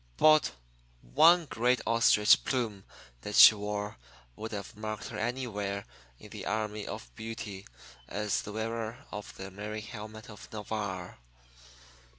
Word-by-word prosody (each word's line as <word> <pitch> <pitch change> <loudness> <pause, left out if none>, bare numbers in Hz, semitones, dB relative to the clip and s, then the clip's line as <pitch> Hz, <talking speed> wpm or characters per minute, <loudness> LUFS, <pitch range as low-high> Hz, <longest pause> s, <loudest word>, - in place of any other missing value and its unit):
But 155 0 +5 0.5
one 165 - +5
great 125 -2 +1
ostrich 110 -2 +5
plume 110 -7 -2 0.4
that 105 - -5
she - - +11
wore 105 -2 -4 0.4
would 110 +1 -6
have 100 -2 -6
marked 110 0 -5
her 105 - -6
anywhere 105 -4 -3 0.3
in - - -14
the - - -7
army 105 -1 -2
of - - -7
beauty 105 -3 -7 0.4
as 105 -1 -1
the 105 - -8
wearer 115 +1 -4
of 105 -1 -8
the 95 0 -7
merry 105 +2 -5
helmet 110 0 -9
of 105 -2 -12
Navarre. 100 - -5
105 Hz, 135 wpm, -30 LUFS, 105-115 Hz, 0.5 s, she